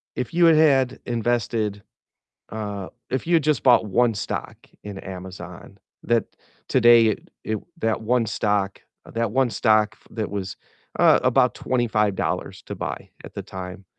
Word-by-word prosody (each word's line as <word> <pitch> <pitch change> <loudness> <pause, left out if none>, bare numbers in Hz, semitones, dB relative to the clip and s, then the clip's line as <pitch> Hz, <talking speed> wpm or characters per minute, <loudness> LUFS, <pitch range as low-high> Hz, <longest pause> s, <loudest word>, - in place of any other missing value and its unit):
if 125 - -4
you 170 0 +4
had 165 -1 +7
had 135 -5 +3
invested 115 -3 -1 0.7
uh, 105 -3 -5 0.2
if 130 - -2
you 175 - 0
had 160 - +3
just 150 -9 +1
bought 120 -3 +5
1 115 +4 +2
stock 100 - -4 0.3
in 100 -2 -7
Amazon, 95 0 -9 0.2
that 120 -1 +1 0.4
today 120 -2 +6
it 110 - -3
it 110 - -2 0.2
that 115 -3 0
1 120 +1 +1
stock 100 -2 -1 0.3
that 115 -2 -1
1 130 +1 +2
stock 110 0 +2
that 110 -3 -3
was, 100 -2 -4 0.4
uh, - - +6
about - - +3
$25 110 -5 -1
to - - -7
buy - - -5
at - - -11
the - - -5
time 95 0 -8
110 Hz, 150 wpm, -23 LUFS, 100-120 Hz, 0.7 s, had